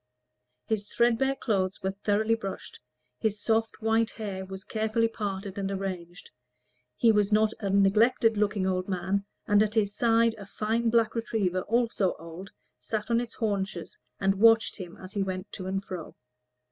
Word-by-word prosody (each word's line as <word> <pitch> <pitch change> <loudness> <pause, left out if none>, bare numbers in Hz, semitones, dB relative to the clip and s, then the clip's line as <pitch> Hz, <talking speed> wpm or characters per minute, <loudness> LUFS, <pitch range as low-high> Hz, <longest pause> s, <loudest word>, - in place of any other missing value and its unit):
His 205 -2 -2
threadbare 240 +5 +2
clothes 190 -7 -1
were 190 - 0
thoroughly 205 +3 +1
brushed: 195 -4 -5 0.4
his 215 -1 0
soft 225 +1 0
white 225 0 +2
hair 200 -4 -5
was 190 0 -8
carefully 220 +1 0
parted 200 -3 -4
and 195 -1 -2
arranged: 185 -2 -5 0.7
he 230 - +5
was 210 -1 +2
not 215 +1 +3
a 200 - -2
neglected 220 +4 +4
looking 205 -2 +1
old 185 0 -1
man; 190 +2 -1 0.2
and 205 0 +4
at 215 0 +1
his 205 -2 +2
side 230 0 +3
a 200 - -9
fine 225 +3 0
black 225 -1 +3
retriever, 210 -6 -1
also 230 -5 +1
old, 170 +4 -9 0.3
sat 215 +1 -3
on 235 0 +3
its 240 -1 -7
haunches, 195 -6 -2 0.2
and 195 0 +3
watched 225 0 +5
him 180 -4 -8
as 185 0 -10
he 200 - -1
went 185 0 -4
to 185 - -6
and 195 +1 -2
fro. 180 -4 -7
205 Hz, 165 wpm, -28 LUFS, 190-225 Hz, 0.7 s, he